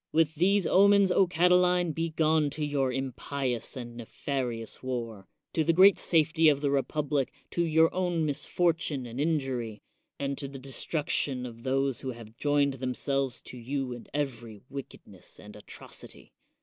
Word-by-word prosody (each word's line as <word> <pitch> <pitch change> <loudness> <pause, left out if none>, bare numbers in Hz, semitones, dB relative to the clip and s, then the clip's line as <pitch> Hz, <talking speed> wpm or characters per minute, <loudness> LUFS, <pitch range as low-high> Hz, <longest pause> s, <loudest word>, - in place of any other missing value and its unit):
With 160 -1 +3
these 190 +4 +3
omens, 200 +1 +5 0.2
Catiline, 180 0 +3
be 165 +2 -1
gone 155 -1 +2
to 150 - -1
your 140 -3 0
impious 130 -1 -3
and 120 -1 -7
nefarious 120 -1 -4
war, 115 -6 -5 0.3
to 160 - +2
the 165 - +3
great 190 +3 +7
safety 160 -1 +4
of 145 -2 +2
the 140 -1 +1
republic, 140 0 0 0.2
to 170 - +1
your 160 0 +3
own 175 -3 0
misfortune 155 -2 0
and 120 +3 -5
in 160 0 +2
jury, 120 -6 -5 0.3
and 140 -1 -3
to 140 - -3
the 135 0 -9
destruction 135 -1 -2
of 115 -1 -9
those 135 0 0
who 130 -2 -4
have 115 -1 -12
joined 145 +1 +2
themselves 130 0 -2
to 125 - -10
you 130 +1 -3
in 120 - -10
every 120 -7 -4
wickedness 140 -1 -10
and - - -12
atrocity. - - -11
140 Hz, 155 wpm, -29 LUFS, 125-160 Hz, 0.3 s, great